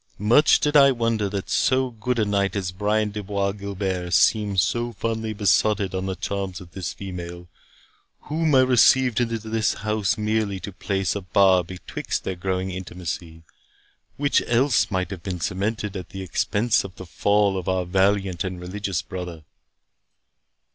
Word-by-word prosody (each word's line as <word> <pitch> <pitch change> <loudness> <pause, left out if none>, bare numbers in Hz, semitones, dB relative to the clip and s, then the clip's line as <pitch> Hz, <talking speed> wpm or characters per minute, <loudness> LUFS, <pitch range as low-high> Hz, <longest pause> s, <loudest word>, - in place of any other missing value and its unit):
Much 120 +9 +5
did 150 0 0
I 140 -2 +8
wonder 115 -4 0
that 100 -1 -4
so 130 0 +1
good 120 +2 -2
a 110 - +2
knight 100 -1 0
as 95 -3 -2
Brian 105 +3 0
de 105 +1 -5
Bois 100 0 -1
Guilbert 95 -3 -3
seemed 105 -3 +3
so 120 +5 0
fondly 110 +1 -3
besotted 100 -1 +2
on 95 0 -2
the 95 - -2
charms 95 -2 -4
of 90 -2 -13
this 95 -2 -4
female, 90 -2 -7 0.7
whom 155 -1 0
I 130 - +7
received 130 -1 +4
into 115 -1 0
this 110 0 -1
house 105 0 -1
merely 105 -2 -1
to 100 - -6
place 95 0 -1
a 100 - -3
bar 95 -1 +4
betwixt 90 +2 -5
their 95 - -2
growing 95 +1 -2
intimacy, 85 -2 -6 0.7
which 145 0 +2
else 120 +2 +3
might 95 -1 -2
have 95 -3 -6
been 90 -2 -4
cemented 100 +4 -2
at 90 -3 -6
the 95 0 -7
expense 105 +5 +1
of 95 -2 -9
the 95 - -9
fall 100 +3 +2
of 95 -1 -3
our 95 -1 0
valiant 95 -1 +1
and 95 -1 -4
religious 95 0 -3
brother." 90 -4 -7
100 Hz, 165 wpm, -24 LUFS, 95-110 Hz, 0.7 s, I